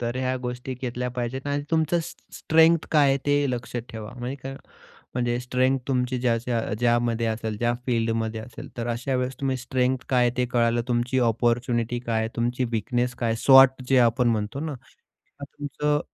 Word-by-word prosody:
तर 120 +1 -2
ह्या 130 0 -1
गोष्टी 125 +1 -4
घेतल्या 125 0 -4
पाहिजेत 125 +3 -4
आणि 145 0 -1
तुमचं 160 +1 +2
स्ट्रे 160 - -11
स्ट्रेंग्थ 160 +1 +4
काय 145 -2 +5
आहे 135 0 +2
ते 145 0 +3
लक्षात 120 -1 -4
ठेवा, 110 -1 -7
म्हणजे 125 +3 -4
काय 135 0 -6 0.6
म्हणजे 120 -1 0
स्ट्रेंग्थ 130 +1 +1
तुमची 125 -1 0
ज्या 120 -2 +2
ज्या 120 0 -1 0.2
ज्यामध्ये 120 -1 +2
असेल, 110 -1 -2
ज्या 120 +1 +1
फील्डमध्ये 115 -2 0
असेल, 125 - -10
तर 115 - -3
अशा 125 +3 -2
वेळेस 125 +1 -2
तुम्ही 135 -1 0
स्ट्रेंग्थ 130 0 -1
काय 125 -2 +3
आहे 120 - -2
ते 125 0 +1
कळालं, 120 -1 +2
तुमची 120 +2 0
अपॉर्च्युनिटी 120 +1 0
काय 110 -1 +1
आहे? 110 - -1
तुमची 120 +2 0
वीकनेस 120 +3 -1
काय? 115 -2 0
स्वॉट 135 -1 +7
जे 135 -1 +5
आपण 120 +1 +3
म्हणतो 110 +4 -1
ना, 155 -2 -3 0.7
तुमचं 145 +1 -2
125 Hz, 180 wpm, -25 LUFS, 120-130 Hz, 0.7 s, स्वॉट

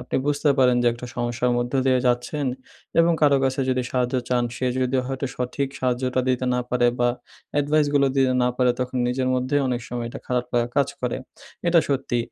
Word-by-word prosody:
আপনি 125 - -3
বুঝতে 145 0 +2
পারেন 125 -2 +5
যে - - +1
একটা 120 +1 -8
সমস্যার 120 +1 0
মধ্য 120 0 -2
দিয়ে 130 -1 +4
যাচ্ছেন 125 +4 0 0.5
এবং 170 +1 +4
কারো 145 -2 +5
কাছে 130 +1 0
যদি 130 0 +1
সাহায্য 125 0 0
চান, 125 -1 +1
সে 130 - -1
যদি 130 +1 +1
হয়তো 135 +1 -3
সঠিক 125 +2 -2
সাহায্যটা 125 0 0
দিতে 130 0 +1
না 125 - +1
পারে 125 -1 +3
বা, 120 0 +3 0.5
এডভাইসগুলো 145 -1 +2
দিতে 130 -1 +3
না 125 - +3
পারে 125 -1 +3
তখন 125 0 -3
নিজের 130 +1 0
মধ্যেই 130 +3 +1
অনেক 125 -1 -1
সময় 120 -1 -4
এটা - - -7
খারাপ 125 -1 0
লাগা 120 0 +1
কাজ 140 -1 +3
করে। 125 -1 -1 0.5
এটা 170 -1 +5
সত্যি। 135 -3 0
125 Hz, 195 wpm, -23 LUFS, 125-135 Hz, 0.5 s, পারেন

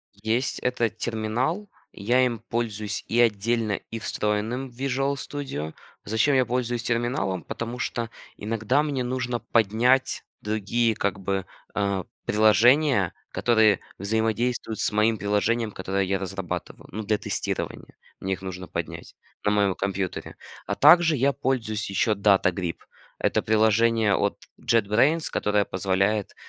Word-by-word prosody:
Есть. 110 +5 -1
Это 120 -2 0
терминал, 120 - -2 0.2
я 120 +6 +2
им 120 -3 -2
пользуюсь 110 -3 -2
и 115 - +1
отдельно, 115 -1 +2 0.2
и 115 - -4
встроенным 110 +5 -2
в 120 - -20
Visual 135 +1 0
Studio. 135 - -5 0.3
Зачем 110 +7 +2
я 130 -1 +4
пользуюсь 120 -1 -1
терминалом? 115 -7 -1
Потому 120 +2 -5
что 115 -2 -2 0.3
иногда 115 +6 0
мне 140 -4 -1
нужно 125 -1 -2
поднять 115 +4 +2 0.2
другие 110 +2 0
как 100 -3 -1
бы, 95 0 -2 0.3
э, 100 -2 0 0.2
приложения, 110 - +4 0.2
которые 110 -4 +3 0.2
взаимодействуют 110 +2 -1
с - - +1
моим 110 +1 +2
приложением, 105 +2 0
которое 95 +1 -1
я 95 +1 0
разрабатываю, 95 -2 -5
ну, 110 +3 -4
для 105 0 +1
тестирования, - - -4 0.2
мне 95 0 -2
их 95 - -6
нужно 95 -1 -6
поднять, - - -6 0.3
на 105 - +2
моем 100 -2 +2
компьютере. 95 -2 -3 0.3
А - - -2
также 160 +1 +6
я 140 +2 +2
пользуюсь 110 -6 -2
еще 100 +3 +2
DataGrip- 95 -3 +2 0.4
это - - +1
приложение 110 0 +3
от 100 - 0 0.2
JetBrains, 115 +9 +2
которое 105 -1 +1
позволяет, 95 +2 0
110 Hz, 130 wpm, -25 LUFS, 100-120 Hz, 0.4 s, также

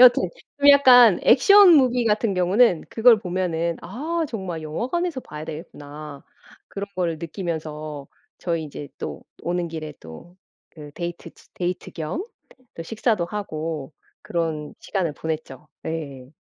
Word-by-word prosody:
여튼 250 -1 +7 0.3
좀 285 0 +4
약간 250 -8 +8
액션 395 - +7
무비 250 -3 +3
같은 215 -1 +1
경우는 185 +1 +3
그걸 230 0 +5
보면은 175 -3 -1
'아 315 - -3
정말 185 -7 -5
영화관에서 260 - -2
봐야 150 -6 -9
되겠구나.' 150 -2 -9 0.4
그런 200 0 -6
걸 170 -3 -1
느끼면서 155 -4 -5 0.3
저희 165 -2 -2
이제 145 -1 -8
또 - - -6 0.2
오는 175 0 -1
길에 155 -2 -6
또 80 - -13 0.4
그 150 -2 -11
데이트 175 0 -6
치 - - -23
데이트 180 0 -3
겸 170 - -4 0.5
또 165 - -6
식사도 215 -1 0
하고 160 -7 -5 0.3
그런 160 -3 -3
시간을 180 -6 -2
보냈죠. 155 -4 -5 0.2
예. 140 -5 -6
170 Hz, 270 characters per minute, -23 LUFS, 155-225 Hz, 0.5 s, 약간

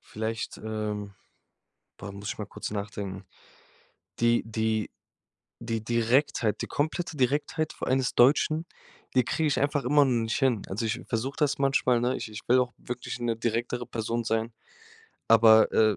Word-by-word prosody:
Vielleicht, 110 +1 -5
ähm 105 -2 -4 0.9
boah, 100 - -7
muss 100 +1 -7
ich - - -4
mal 105 - -4
kurz 105 - -7
nachdenken. 100 -2 -5 1.0
Die 120 0 +3
die 110 -1 -1 0.7
die 115 -1 -3
Direktheit 115 -1 +1
die - - -3
komplette 160 +3 -2
Direktheit 145 +4 0
vor - - -6
allen 130 +1 +3
des 130 - -1
Deutschen, 155 +5 +4 0.5
die 125 - +5
kriege 160 +6 0
ich 145 - +1
einfach 145 -1 0
immer 145 +2 +5
noch 120 -4 +1
nicht 110 - -1
hin. 130 -7 +1
Also, 105 +4 -3
ich 110 - -1
versuche 125 +5 -2
das 150 -3 +1
manchmal, 130 -3 +2
ne? 125 +2 +1
Ich - - -6
ich 105 0 -8
will 130 +1 +6
auch 125 -1 -1
wirklich 125 0 -6
'ne 115 -2 -1
direktere 120 +1 -2
Person 115 +1 -3
sein, 115 +1 0 0.8
aber, 110 -1 +6
äh, 110 -3 +4
115 Hz, 165 wpm, -27 LUFS, 110-130 Hz, 1.0 s, will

